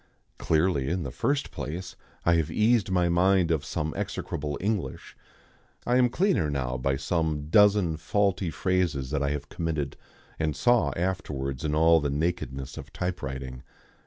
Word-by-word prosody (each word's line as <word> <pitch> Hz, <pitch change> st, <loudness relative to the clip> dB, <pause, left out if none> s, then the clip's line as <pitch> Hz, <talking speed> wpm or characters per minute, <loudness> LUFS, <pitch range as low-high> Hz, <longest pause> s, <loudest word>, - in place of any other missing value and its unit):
Clearly, 80 Hz, -4 st, +1 dB
in 90 Hz, +1 st, -1 dB
the 70 Hz, -, -5 dB
first 140 Hz, -, -1 dB
place, 90 Hz, +4 st, -6 dB, 0.3 s
I 85 Hz, -, +5 dB
have 80 Hz, -3 st, 0 dB
eased 110 Hz, -1 st, +2 dB
my 90 Hz, -2 st, +2 dB
mind 90 Hz, 0 st, +3 dB
of 80 Hz, -4 st, +1 dB
some 75 Hz, +1 st, -3 dB
execrable 75 Hz, -2 st, -3 dB
English. 95 Hz, -9 st, -3 dB, 0.7 s
I 120 Hz, +1 st, +3 dB
am 125 Hz, -1 st, +4 dB
cleaner 175 Hz, -, +1 dB
now 65 Hz, -3 st, -2 dB
by 65 Hz, +2 st, 0 dB
some 75 Hz, 0 st, -1 dB
dozen 100 Hz, -4 st, +4 dB
faulty 95 Hz, +2 st, 0 dB
phrases 80 Hz, -7 st, 0 dB
that 75 Hz, -2 st, 0 dB
I 70 Hz, +1 st, 0 dB
committed 80 Hz, -5 st, -3 dB, 0.4 s
and 80 Hz, -3 st, 0 dB
saw 85 Hz, -1 st, +3 dB
afterwards 75 Hz, -7 st, -3 dB
in 75 Hz, -1 st, 0 dB
all 80 Hz, +1 st, +5 dB
the 75 Hz, -2 st, -1 dB
nakedness 70 Hz, -3 st, -2 dB
of -, -, -9 dB
typewriting. 65 Hz, -8 st, -4 dB
80 Hz, 150 wpm, -27 LUFS, 70-95 Hz, 0.7 s, I